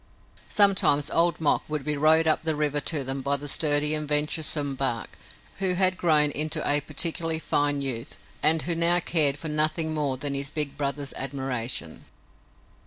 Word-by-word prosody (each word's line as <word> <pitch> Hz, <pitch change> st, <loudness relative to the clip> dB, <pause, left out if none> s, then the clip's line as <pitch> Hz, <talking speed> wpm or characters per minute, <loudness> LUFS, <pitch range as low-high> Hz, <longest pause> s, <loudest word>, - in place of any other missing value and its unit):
Sometimes 190 Hz, -8 st, +3 dB
Old 170 Hz, +1 st, +1 dB
Mok 155 Hz, -3 st, +2 dB
would 150 Hz, -2 st, -4 dB
be 150 Hz, +1 st, -2 dB
rowed 155 Hz, +2 st, +3 dB
up 155 Hz, -, +1 dB
the 160 Hz, -1 st, -1 dB
river 150 Hz, -1 st, -1 dB
to 145 Hz, -1 st, -1 dB
them 135 Hz, +1 st, -4 dB
by 140 Hz, +1 st, 0 dB
the 145 Hz, +1 st, -8 dB
sturdy 150 Hz, +1 st, +2 dB
and 150 Hz, -1 st, -2 dB
venturesome 150 Hz, -1 st, -1 dB
Bark, 130 Hz, -4 st, -3 dB, 0.5 s
who 190 Hz, -2 st, 0 dB
had 185 Hz, 0 st, +2 dB
grown 155 Hz, -4 st, +3 dB
into 150 Hz, +1 st, -1 dB
a 145 Hz, 0 st, +3 dB
particularly 160 Hz, +2 st, 0 dB
fine 145 Hz, -2 st, 0 dB
youth 125 Hz, -2 st, -5 dB, 0.2 s
and 160 Hz, 0 st, +3 dB
who 175 Hz, -, -1 dB
now 170 Hz, +1 st, +3 dB
cared 150 Hz, -5 st, +1 dB
for 160 Hz, -, -7 dB
nothing 155 Hz, +1 st, 0 dB
more 145 Hz, -4 st, -2 dB
than 140 Hz, +1 st, -3 dB
his 140 Hz, 0 st, -2 dB
big 150 Hz, -2 st, -3 dB
brother's 140 Hz, -1 st, -3 dB
admiration. 130 Hz, -, -4 dB
150 Hz, 175 wpm, -25 LUFS, 140-160 Hz, 0.5 s, Sometimes